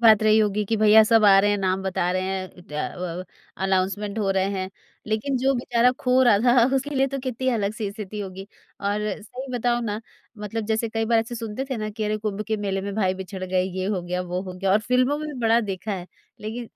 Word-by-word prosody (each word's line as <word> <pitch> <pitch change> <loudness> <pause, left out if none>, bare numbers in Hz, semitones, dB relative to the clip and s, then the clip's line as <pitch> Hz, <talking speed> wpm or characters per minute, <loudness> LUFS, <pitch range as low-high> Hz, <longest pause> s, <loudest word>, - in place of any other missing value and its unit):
बात 220 -2 +7
रही 215 0 +5
होगी 210 -1 +1
कि 225 +2 0
भईया 215 +1 +7
सब 225 0 +4
आ 195 -1 +8
रहे 205 +1 +2
हैं, 205 - +2
नाम 190 0 0
बता 185 -2 0
रहे 185 - 0
हैं 190 0 -3
अ 175 +1 -5
अ, - - -7 0.4
अनाउंसमेंट 195 +2 0
हो 200 -2 +1
रहे 190 -1 +2
हैं। 190 -1 -3 0.4
लेकिन 220 +6 -1
जो 265 +2 +2
बेचारा 240 0 +2
खो 255 +1 +3
रहा 235 -5 +5
था 245 -1 +6
उसके 290 +2 -3
लिए 270 0 +3
तो 275 0 -4
कितनी 260 0 -2
अलग 210 -4 0
सी 215 -3 -3
स्थिति 210 0 -7
होगी 190 0 -7 0.3
और 205 +1 0 0.2
सही 255 +5 -8
बताऊँ 240 0 0
ना 210 0 -3 0.4
मतलब 210 +2 -4
जैसे 225 +1 0
कई 225 0 -1
बार 230 0 +3
ऐसे 225 +2 -2
सुनते 225 +2 -4
थे 260 - -1
ना 215 -1 -3
कि 215 +1 -4
अरे, 210 0 0
कुम्भ 210 -1 -3
के 220 - +1
मेले 195 -2 -2
में 200 +1 -5
भाई 190 -3 +1
बिछड़ 190 0 -6
गए, 185 0 +1
ये 185 0 -3
हो 195 -3 -1
गया, 180 +1 -2
वो 180 0 -3
हो 185 - -7
गया 190 +1 -1
और 205 - +5
फ़िल्मों 250 +5 +2
में 305 -3 -5
बड़ा 230 0 +4
देखा 205 0 -4
है। 180 -2 -5 0.3
लेकिन 225 +2 -5
210 Hz, 240 wpm, -24 LUFS, 190-230 Hz, 0.4 s, आ